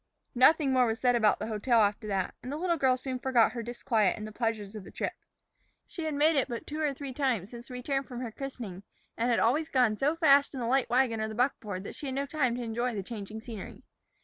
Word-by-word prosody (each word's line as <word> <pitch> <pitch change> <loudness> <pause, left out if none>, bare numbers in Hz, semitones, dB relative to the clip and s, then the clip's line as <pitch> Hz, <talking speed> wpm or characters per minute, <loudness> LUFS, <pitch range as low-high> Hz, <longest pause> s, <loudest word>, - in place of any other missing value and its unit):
Nothing 270 +2 +5
more 255 -2 +4
was 225 +1 -1
said 245 -1 +3
about 220 -3 +4
the - - -4
hotel 225 +2 +2
after 210 +1 0
that, 195 -2 -1
and 255 - -6
the 290 - -3
little 340 +1 +1
girl 265 -4 +2
soon 255 0 -4
forgot 250 -3 +3
her 240 - -4
disquiet 230 -3 0
in 215 - -6
the 215 - -7
pleasures 220 -3 -2
of 215 -3 -7
the - - -11
trip. - - -3 0.7
She 330 - -6
had 310 -2 -2
made 305 +3 +4
it 270 -3 +2
but 235 -1 -5
two 305 +1 -4
or 300 -2 +2
three 275 -1 -7
times 245 -8 -1
since 235 0 -9
the 250 - -8
return 270 +2 -1
from 250 -3 -8
her 240 -3 -4
christening, 230 -8 -7 0.3
and 235 +2 0
had 235 - +3
always 300 +8 +2
gone 250 -6 +3
so 290 +6 +1
fast 285 -4 +4
in - - -4
the 240 - -2
light 260 +1 +2
wagon 240 -2 +2
or 220 - -1
the 220 - -6
buckboard 210 -6 -1
that - - -7
she 290 - -7
had 260 - -3
no 275 +1 -1
time 260 -4 0
to 245 - -4
enjoy 235 +1 -2
the 200 - -3
changing 220 0 -7
scenery. 225 -4 -8
245 Hz, 255 wpm, -29 LUFS, 220-275 Hz, 0.7 s, Nothing